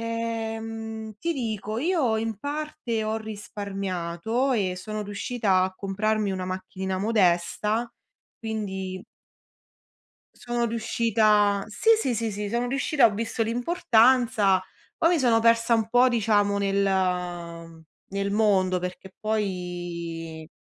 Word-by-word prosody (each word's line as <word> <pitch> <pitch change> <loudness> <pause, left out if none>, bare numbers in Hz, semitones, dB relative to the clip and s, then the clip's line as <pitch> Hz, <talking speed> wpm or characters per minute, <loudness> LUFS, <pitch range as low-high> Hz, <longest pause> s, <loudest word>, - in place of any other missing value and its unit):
Ehm, 225 -1 -4
ti 335 - 0
dico, 220 -5 -3
io 290 -7 +1
in 225 -2 -3
parte 285 -4 -3
ho 215 +1 -1
risparmiato 200 +1 -3
e 190 -6 0
sono 215 +3 -5
riuscita 205 -1 0
a 185 0 -1
comprarmi 205 +2 -1
una 185 -1 -3
macchinina 185 0 -4
modesta, 210 +3 +1 0.5
quindi 190 -4 -4 1.4
sono 240 0 -1
riuscita 215 -3 +2
sì, 220 - -1
sì, 250 - 0
sì, 225 -1 -1
sì, 205 +1 -4
sono 235 +3 -1
riuscita, 275 0 +3
ho 220 - +3
visto 225 +2 -1
l'importanza. 230 - +3 0.3
Poi 330 - +4
mi - - +1
sono 235 -4 +3
persa 230 0 +4
un 225 -1 +1
po' 245 +2 +5
diciamo 205 -4 +2
nel 180 -4 -1 0.3
nel 200 0 -1
mondo, 195 -4 +3
perché 180 +1 -7
poi, 175 -6 -4
215 Hz, 115 wpm, -26 LUFS, 190-230 Hz, 1.4 s, po